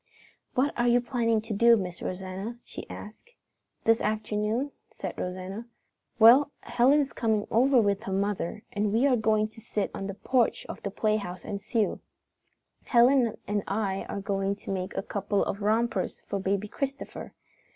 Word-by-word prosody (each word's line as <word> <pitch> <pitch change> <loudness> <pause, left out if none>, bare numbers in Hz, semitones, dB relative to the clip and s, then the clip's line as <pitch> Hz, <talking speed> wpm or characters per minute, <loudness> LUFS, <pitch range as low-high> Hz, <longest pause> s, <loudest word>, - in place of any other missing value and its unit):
"What 270 +3 +2
are 240 - +3
you 240 0 +5
planning 235 -3 +1
to 220 0 -5
do, 235 +3 +6
Miss 180 -4 -5
Rosanna?" 190 +5 -5
she - - -9
asked. 215 - -10 0.5
"This 225 0 +4
afternoon?" 215 +5 -1 0.2
said - - -6
Rosanna. 185 +5 -5 0.5
"Well, 240 +6 +8
Helen 250 +5 +4
is 275 - -3
coming 220 -3 0
over 255 +3 +5
with 200 -2 +2
her 195 - -4
mother 200 0 -1
and 205 0 0
we 230 +5 +3
are 270 -3 +4
going 220 -2 +2
to 225 - -14
sit 210 -1 -2
on 195 - -4
the 195 - -5
porch 250 +2 +1
of - - -8
the 200 - -3
playhouse 200 -3 -1
and 200 -1 -4
sew. 220 -1 0 0.9
Helen 240 -1 +4
and 205 0 0
I 195 -2 -1
are 200 - -3
going 195 0 -1
to 200 - -7
make 185 -1 -3
a - - -1
couple 200 0 -1
of 200 - -3
rompers 215 -1 0
for 200 - -4
Baby 195 +2 -1
Christopher. 275 +5 -5
215 Hz, 170 wpm, -28 LUFS, 200-235 Hz, 0.9 s, Well